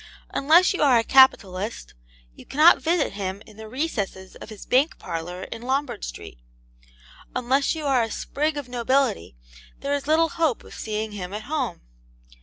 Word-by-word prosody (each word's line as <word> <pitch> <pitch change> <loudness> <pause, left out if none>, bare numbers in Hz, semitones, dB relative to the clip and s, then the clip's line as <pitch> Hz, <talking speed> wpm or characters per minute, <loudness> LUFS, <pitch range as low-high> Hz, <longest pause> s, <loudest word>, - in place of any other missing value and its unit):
Unless 330 +8 +4
you - - -3
are 270 -5 +5
a 230 - +2
capitalist, 220 -6 +3 0.4
you - - -14
cannot 310 +5 +5
visit 330 - 0
him 195 0 -5
in 215 - -17
the 220 0 -10
recesses 215 - -4
of - - -11
his 215 -3 -10
bank 275 +5 +2
parlour 175 +1 -6
in 225 - -8
Lombard 265 - -2
Street. - - -8 1.0
Unless 260 +5 +1
you 310 -2 -5
are 270 -3 +3
a 225 - -1
sprig 300 +6 -2
of 285 -3 -5
nobility 245 - 0 0.5
there 280 +1 -1
is 285 0 -3
little 325 +1 +3
hope 315 -8 -1
of - - -14
seeing 215 0 -4
him 190 -2 -7
at 215 - -6
home. 260 - -3
250 Hz, 170 wpm, -24 LUFS, 205-285 Hz, 1.0 s, are